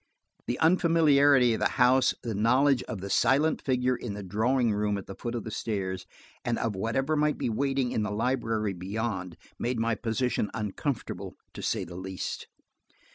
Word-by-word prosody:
The 120 - -1
unfamiliarity 145 -7 +4
of - - -2
the - - +2
house, 130 +1 +4
the 115 - -3
knowledge 125 +6 +3
of 105 -4 -6
the 100 - -5
silent 150 +9 +3
figure 125 -1 +1
in 115 -4 -5
the 105 - -6
drawing 115 +4 +1
room 105 0 0
at 100 - -7
the 95 - -8
foot 120 +4 -5
of 115 - -3
the 110 - -6
stairs, 95 -4 -3 0.4
and 120 -1 0
of 115 -3 -1
whatever 135 +9 0
might 150 0 +1
be 120 - -1
waiting 135 +1 0
in - - 0
the 105 - -1
library 110 -2 -1
beyond, 95 -1 -4 0.2
made 120 +1 -1
my 115 0 +1
position 115 -1 -1
uncomfortable, 110 +5 -4 0.2
to - - -8
say - - -1
the 85 +1 -9
least. 95 0 -5
115 Hz, 180 wpm, -28 LUFS, 105-130 Hz, 0.4 s, unfamiliarity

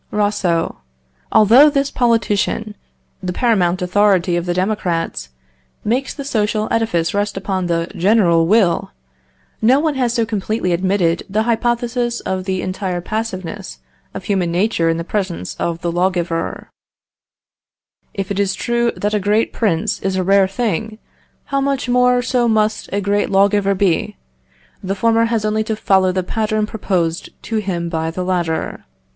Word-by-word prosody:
Rousseau. 205 -5 0 0.5
Although 235 +8 +7
this 280 -1 0
politician, 220 -3 0 0.5
the 185 -1 -3
paramount 185 -5 +1
authority 185 -1 +2
of 175 0 -2
the 175 - +1
Democrats, 180 - -2 0.6
makes 250 +5 0
the 280 - -7
social 215 -4 0
edifice 175 -8 0
rest 205 0 -1
upon 190 -2 -2
the 165 -1 0
general 175 -3 +3
will, 190 -4 +2 0.7
no 255 +5 +5
one 310 0 +1
has 255 -3 0
so 230 -2 +1
completely 215 -3 -1
admitted 180 -1 +1
the 215 +3 +1
hypothesis 240 +1 0
of 185 0 -3
the 185 -1 -2
entire 185 -1 -3
passiveness 185 - -5 0.4
of - - -5
human 185 -4 0
nature 175 -2 +1
in 165 - +1
the 170 - -3
presence 175 - -3
of 170 0 -2
the 170 - -1
lawgiver: 175 -2 -2 1.4
"If 195 0 -4
it 200 - -2
is 195 -1 +1
true 235 +4 0
that 205 +1 -2
a 210 - +2
great 210 +3 +1
prince 205 -2 0
is 190 0 -2
a 185 - 0
rare 195 +1 +4
thing, 215 0 -2 0.6
how 275 - +2
much 275 -2 -1
more 250 0 +3
so 245 -1 +1
must 215 -1 +1
a 200 - -1
great 200 +1 0
lawgiver 200 0 +3
be? 195 +2 0 0.7
The 195 +1 -2
former 230 +3 +2
has 230 -2 -1
only 215 +1 +1
to 220 - -1
follow 190 -3 +2
the 185 0 -1
pattern 215 +2 -1
proposed 180 -6 -2
to 225 - -2
him 185 -5 -2
by 160 -1 -2
the 180 +3 -4
latter. 175 -3 -2
200 Hz, 155 wpm, -18 LUFS, 180-225 Hz, 1.4 s, Although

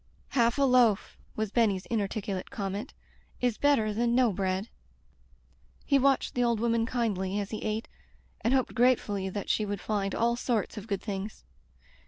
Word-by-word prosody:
"Half 235 0 +2
a 280 - +3
loaf," 245 -6 +3 0.2
was 215 -2 -2
Benny's 210 -6 +2
inarticulate 200 -3 -2
comment, 200 -4 -4 0.4
"is 245 -3 0
better 250 -8 +3
than 235 +2 +1
no 245 -4 +4
bread." 190 +2 -1 1.2
He 280 -1 +4
watched 275 0 +2
the 245 - +1
old 235 -2 +2
woman 230 0 +1
kindly 205 -6 -1
as 200 -1 -4
he 215 - -4
ate, 215 +1 -2 0.6
and 230 - +2
hoped 260 -1 +1
gratefully 225 -6 +2
that 200 +1 -5
she 215 - +1
would 205 -1 -3
find 200 -1 -2
all 235 +1 +2
sorts 235 -5 -1
of 210 0 -7
good 200 -3 -2
things. 205 0 -5
220 Hz, 165 wpm, -29 LUFS, 200-240 Hz, 1.2 s, no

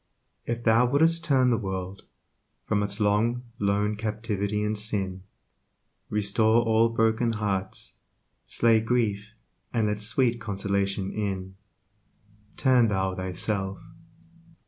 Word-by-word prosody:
If 120 0 -3
thou 115 +2 +4
would'st 160 +5 +3
turn 130 -4 +3
the 115 - +1
world 95 -2 -5 0.6
From 105 - 0
its 100 +1 -2
long, 110 +4 +1 0.2
lone 105 +1 +1
captivity 105 -1 -2
in 105 +1 -1
sin, 100 -3 -2 0.9
Restore 110 +2 +2
all 115 0 +3
broken 115 +1 +1
hearts, 100 -3 -3 0.5
Slay 115 -1 +3
grief, 110 -3 -1 0.4
and 115 -3 +1
let 105 0 -2
sweet 115 +2 +2
consolation 100 -1 -1
in, 95 -3 -4 1.0
Turn 130 -4 +4
thou 95 -2 0
thyself. 95 +2 -3
105 Hz, 110 wpm, -26 LUFS, 100-115 Hz, 1.0 s, thou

